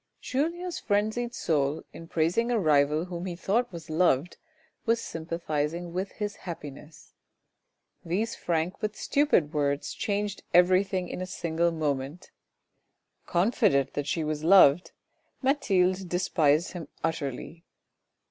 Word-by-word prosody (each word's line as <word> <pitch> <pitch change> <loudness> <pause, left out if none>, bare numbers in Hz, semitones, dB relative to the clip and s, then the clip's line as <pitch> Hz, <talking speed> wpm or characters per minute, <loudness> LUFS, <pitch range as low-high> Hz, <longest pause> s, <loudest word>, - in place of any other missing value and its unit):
Julien's 340 +6 -2
frenzied 220 +3 -1
soul, 145 -1 0
in 165 - -10
praising 170 +10 +1
a 240 - +2
rival 150 -3 +3
whom 175 0 -5
he 175 - -4
thought 210 +7 0
was 170 -3 -9
loved, 160 -1 +1 0.5
was 230 -1 +2
sympathising 165 -1 -3
with 190 +2 -3
his 205 -1 -4
happiness. 150 -3 -9 0.9
These 205 +7 -1
frank 170 +1 -1
but 215 -1 -3
stupid 280 - +2
words 145 -1 -1
changed 205 -1 -2
everything 185 +1 +4
in 180 - -6
a 185 - -4
single 170 -1 0
moment; 150 +1 -3 1.0
confident 180 - +2
that 145 0 -3
she 160 +1 -1
was 155 0 -3
loved, 175 -2 +6 0.5
Mathilde 190 -9 +2
despised 165 -2 +2
him 170 -5 -7 0.2
utterly. 160 +1 -3
175 Hz, 120 wpm, -28 LUFS, 155-200 Hz, 1.0 s, loved